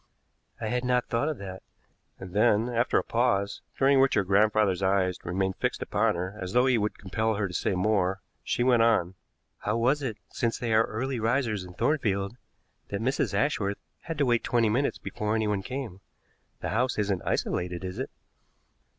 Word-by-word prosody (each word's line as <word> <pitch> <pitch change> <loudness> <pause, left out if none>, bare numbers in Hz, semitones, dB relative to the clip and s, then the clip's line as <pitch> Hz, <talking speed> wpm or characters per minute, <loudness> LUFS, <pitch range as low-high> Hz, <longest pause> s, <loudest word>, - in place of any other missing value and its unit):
"I 110 - -3
had 125 +1 -1
not 125 -1 +1
thought 120 +6 +1
of 155 - -3
that." 95 -2 -7 0.6
And 95 -2 -9
then, 110 +2 +3
after 120 0 +1
a - - +2
pause, 115 -4 0 0.2
during 135 0 +4
which 135 0 +4
her 105 - +3
grandfather's 100 0 +3
eyes 95 -1 +1
remained 95 +2 -1
fixed - - -1
upon - - +1
her 90 +3 -4
as 90 +1 -4
though 125 +1 +4
he 130 -3 +3
would 105 0 -2
compel 110 +3 -1
her 100 -1 0
to 90 - -9
say 90 - 0
more, 95 -1 +1 0.2
she 120 - 0
went 125 -2 +4
on: 110 -6 +3 0.5
"How - - -1
was 130 +5 +2
it, 120 -6 -3
since 115 -1 -1
they 115 -2 -1
are 110 +1 +5
early 125 +3 -3
risers 115 -3 0
in 90 -1 -11
Thornfield, 105 -8 0 0.5
that 100 - -3
Mrs. 130 +5 0
Ashworth 105 -9 0 0.2
had 165 -2 -6
to 145 - +2
wait 120 -2 +2
twenty 115 -2 +2
minutes 130 +6 +1
before 105 +1 -3
anyone 105 -3 0
came? 120 -4 -6 0.6
The - - -2
house 125 +3 0
isn't 100 -3 0
isolated, 90 0 -2
is 95 +4 -5
it?" 130 - -3
110 Hz, 185 wpm, -28 LUFS, 95-125 Hz, 0.6 s, are